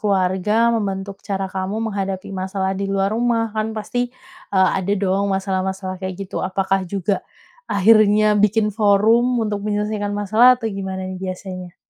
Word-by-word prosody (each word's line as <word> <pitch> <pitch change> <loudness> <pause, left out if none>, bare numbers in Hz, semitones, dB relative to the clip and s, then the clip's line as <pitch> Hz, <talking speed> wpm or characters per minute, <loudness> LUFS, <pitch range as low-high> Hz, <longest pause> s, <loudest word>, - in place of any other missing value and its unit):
keluarga 205 +3 +2
membentuk 195 -2 -3
cara 195 -1 -3
kamu 195 +4 -2
menghadapi 195 -1 -4
masalah 190 0 -2
di 195 +1 -3
luar 195 +1 0
rumah? 230 -1 0
Kan 220 0 -3
pasti, 245 +3 -2 0.4
eee, 190 -1 +4
ada 195 +2 -1
dong 195 +1 0
masalah-masalah 190 -1 -2
kayak 190 -1 -4
gitu. 185 - -5
Apakah 195 +1 0
juga 195 0 -1 0.5
akhirnya 215 +1 +5
bikin 210 0 +2
forum 220 +4 +3
untuk 205 -1 -2
menyelesaikan 210 0 -2
masalah, 225 +5 +5
atau 230 - -11
gimana 190 -1 -4
nih, 185 0 -6
biasanya? 185 -1 -6
200 Hz, 145 wpm, -20 LUFS, 190-215 Hz, 0.5 s, akhirnya